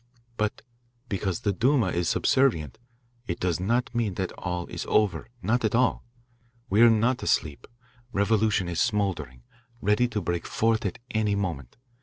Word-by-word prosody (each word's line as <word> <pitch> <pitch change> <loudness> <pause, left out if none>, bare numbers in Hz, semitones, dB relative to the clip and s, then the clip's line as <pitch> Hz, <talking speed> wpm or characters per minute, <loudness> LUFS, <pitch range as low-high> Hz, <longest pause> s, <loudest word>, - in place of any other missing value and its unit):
"But 105 -1 -2 0.5
because 95 -3 -2
the 100 - 0
Duma 125 0 +2
is 85 -1 0
subservient, 95 - +1 0.5
it 85 - -3
does 90 -3 0
not 120 +8 0
mean 115 -6 -1
that 95 -1 -2
all 90 -1 -4
is - - -6
over. 100 -5 +1 0.2
Not 120 +6 +1
at 110 0 +1
all. 125 +1 +2 0.7
We 105 +3 +4
are 120 - +9
not 115 +3 +2
asleep. 75 -2 -1 0.4
Revolution 105 -1 +2
is 85 -1 -2
smouldering, 85 - -1 0.4
ready 105 +3 +2
to 110 -3 -2
break 85 -2 -3
forth 110 -1 +1
at 90 - -5
any 105 -2 +1
moment. 85 - -4
100 Hz, 155 wpm, -26 LUFS, 90-115 Hz, 0.7 s, are